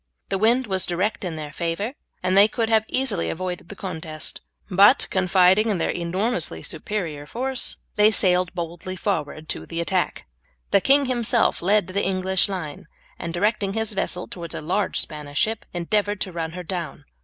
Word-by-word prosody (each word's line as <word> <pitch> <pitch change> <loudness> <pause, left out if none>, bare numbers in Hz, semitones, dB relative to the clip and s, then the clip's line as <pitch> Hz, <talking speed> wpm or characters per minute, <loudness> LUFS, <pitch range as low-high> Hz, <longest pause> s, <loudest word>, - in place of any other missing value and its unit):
The 195 - 0
wind 235 +5 +3
was 190 -3 +1
direct 185 +6 -1
in 175 -3 -3
their 150 -2 -6
favour, 170 +9 -2 0.3
and 185 +1 +2
they 200 +2 +8
could 225 0 -1
have 220 -1 +3
easily 255 -9 0
avoided 180 0 -4
the 200 - -8
contest, 160 -5 -4 0.3
but, 200 +7 +6
confiding 190 +3 +4
in 205 - +1
their - - 0
enormously 175 - -2
superior 160 -4 -3
force, 260 - -2 0.2
they 210 +1 +7
sailed 180 -4 +2
boldly 175 +2 -5
forward 155 -2 -2
to - - -3
the 165 - -4
attack. 180 +1 0 0.5
The 200 - +5
king 280 +4 +4
himself 240 -3 +2
led 200 +2 +3
the 190 +2 -1
English 190 +1 +1
line, 165 -6 -5 0.3
and 170 - -4
directing 200 +2 0
his 220 0 0
vessel 180 -2 -1
towards 170 -3 -6
a - - -3
large 185 +6 0
Spanish 150 -2 -4
ship, 220 +5 +1
endeavoured 205 +3 0
to 185 - -2
run 165 -1 -4
her 180 0 -6
down. 170 -4 -5
185 Hz, 175 wpm, -24 LUFS, 170-210 Hz, 0.5 s, they